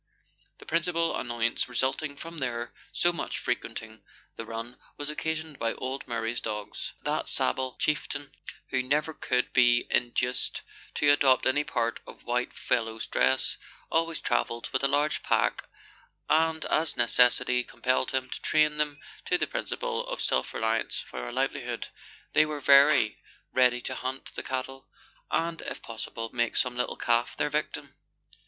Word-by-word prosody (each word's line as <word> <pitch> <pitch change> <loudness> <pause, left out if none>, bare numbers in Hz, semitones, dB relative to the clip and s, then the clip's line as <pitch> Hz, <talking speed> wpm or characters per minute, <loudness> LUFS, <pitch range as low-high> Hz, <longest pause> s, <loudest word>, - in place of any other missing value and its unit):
The - - -14
principal 165 +1 +1
annoyance 120 0 0
result 130 +2 0
ing 150 -2 -4
from 165 +2 -7
their 120 -3 -3 0.2
so 175 0 +2
much - - -3
frequenting 110 -1 -4 0.3
the 115 - -7
run 115 +2 -6 0.2
was 145 +1 -3
occasioned 160 -1 -3
by 115 0 0
old 130 +1 -4
Murray's 115 -1 -2
dogs. 105 -2 -5
That - - -1
sable 130 - 0
chieftain, 145 -1 -1 0.4
who 130 - +2
never 150 +5 0
could 125 -3 0
be 120 -2 +6
in 120 0 +3
duced 125 +1 -1 0.3
to 145 -1 +5
adopt 135 -3 +4
any 145 +3 +3
part 115 -4 -1
of - - -12
"whitefellow's" 120 -2 -1
dress, 65 +1 +1 0.3
always 165 0 +1
travelled 120 -1 -1
with 130 - +1
a - - +5
large 145 +2 +1
pack, - - +1 0.6
and 160 0 +2
as 160 +1 +1
necessity 125 +1 +4
compelled 125 +1 0
him 130 -1 -1
to - - -5
train 155 -1 +3
them 150 -1 0 0.3
to - - +2
the - - +1
principle - - -3
of - - -3
self - - +1
reliance 110 0 0
for - - -6
a - - -6
livelihood, - - -2 0.4
they 155 - +7
were 150 -1 -3
very 140 -4 +6 0.3
ready 125 -1 +4
to 130 - -3
hunt 130 +1 -5
the - - -4
cattle, 135 +1 -4 0.4
and, 165 0 0
if - - -6
possible, 115 0 -5
make 120 -2 0
some 125 -1 +1
little 125 0 -2
calf 120 0 +1
their 150 - 0
victim. 145 -1 -3
130 Hz, 155 wpm, -28 LUFS, 120-150 Hz, 0.6 s, they